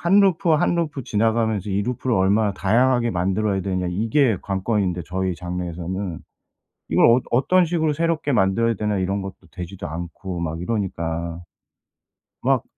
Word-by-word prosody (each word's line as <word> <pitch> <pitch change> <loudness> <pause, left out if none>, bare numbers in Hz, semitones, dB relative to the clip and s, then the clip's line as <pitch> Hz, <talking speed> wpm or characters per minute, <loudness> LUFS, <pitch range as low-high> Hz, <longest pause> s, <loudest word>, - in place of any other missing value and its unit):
1 195 +4 +5
루프 190 -2 +3
1 155 +2 +3
루프 150 -5 -2
지나가면서 110 -2 0
이 100 +1 +1
루프를 125 +1 -1
얼마나 100 +2 +3
다양하게 120 +5 +2
만들어야 95 +2 0
되느냐 95 -2 -1
이게 115 +5 +2
관건인데 95 -2 -1
저희 95 +1 -2
장르에서는. 90 +1 -4 0.7
이걸 - - +3
어 120 +2 +6
어떤 175 +9 +3
식으로 160 -2 +1
새롭게 160 -1 0
만들어야 115 +2 +2
되나 105 -1 -1
이런 95 +2 -1
것도 95 0 -6 0.2
되지도 90 +4 -6
않고 85 +3 -6
막 80 -1 -3
이러니까. 85 -5 -3 1.0
막 - - +2
100 Hz, 340 characters per minute, -22 LUFS, 90-120 Hz, 1.0 s, 어